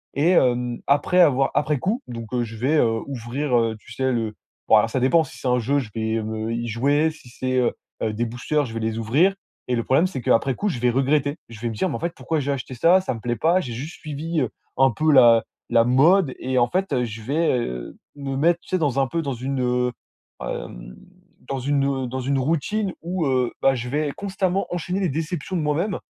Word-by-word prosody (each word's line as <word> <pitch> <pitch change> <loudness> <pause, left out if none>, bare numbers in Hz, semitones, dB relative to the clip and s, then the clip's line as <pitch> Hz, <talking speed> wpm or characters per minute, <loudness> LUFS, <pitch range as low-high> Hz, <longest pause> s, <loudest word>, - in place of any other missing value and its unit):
Et 150 +5 +3
hem, 125 -5 +2
après 145 +6 +3
avoir 135 -5 +4
après 150 -2 +1
coup, 220 - -1
donc 115 -2 -7
heu, 120 -1 +1
je 115 -1 -7
vais 130 +8 +1
heu, 115 -5 +2
ouvrir 130 +1 -1
heu, 115 -1 +1
tu - - -16
sais 130 0 0
le 115 -3 -2 0.3
bon - - +6
alors 105 +1 +5
ça 130 - 0
dépend 145 +6 +4
si - - -12
c'est - - -4
un 125 0 +3
jeu, 135 +4 +1
je 120 -6 -5
vais 110 0 -1
me 110 +1 -4
heu, - - -1
y 120 0 -3
jouer. 140 +7 +2
Si 155 -5 -13
c'est 130 +1 -2
heu 125 -2 +2 0.3
heu 110 - 0
des 115 +3 -1
boosters 125 +6 -1
je 115 - -8
vais - - -2
les 110 0 -2
ouvrir. 145 - +3 0.3
Et 125 - +1
le 115 - -1
problème 135 +9 +3
c'est, 160 -9 -3
qu'après 125 +3 +2
coup, 205 - -1
je 150 - -3
vais 120 +1 +2
regretter. 145 +3 +1
Je 115 -2 -11
vais 120 - -1
me - - -5
dire: 180 - -1
«Mais - - -3
en - - -4
fait, 170 0 -2
pourquoi 160 -1 -2
j'ai 140 0 -1
acheté 130 -1 -4
ça? 170 +9 +5
Ça 185 - -3
me 115 - -9
plaît 120 0 -1
pas». 165 - +3
J'ai 125 -7 -6
juste 140 +8 -6
suivi 155 +2 -3
heu, 125 - -1 0.3
un 135 0 +5
peu 155 +8 +1
la 120 -5 +6 0.3
la 115 - +5
mode 140 +6 +4
et 130 0 0
en 120 - +4
fait 185 0 -1
heu, 125 -2 +1
je 110 -1 -7
vais 155 +8 0
heu, 60 - -5 0.2
me 140 -1 -4
mettre, 170 +4 +3
tu - - -25
sais? 185 - +1
Dans 145 -6 0
un 135 - +2
peu, 165 +5 -2
dans 140 -2 -2
une, 130 +2 -3
heu, 125 0 +1 0.5
hem, - - -6 0.5
dans 135 - -1
une, 140 +2 +1
hem, 135 -2 -1
dans 130 +2 -4
une 135 +2 0
routine 165 +8 0
où 175 0 -2
heu, 130 -3 +1
bah 135 - +5
je 125 -1 -4
vais 145 +2 -1
constamment 195 +1 -1
enchaîner 175 +2 -2
les 190 -3 +1
déceptions 160 +4 -3
de - - 0
moi-même. 160 +7 0
135 Hz, 250 wpm, -23 LUFS, 120-155 Hz, 0.5 s, bon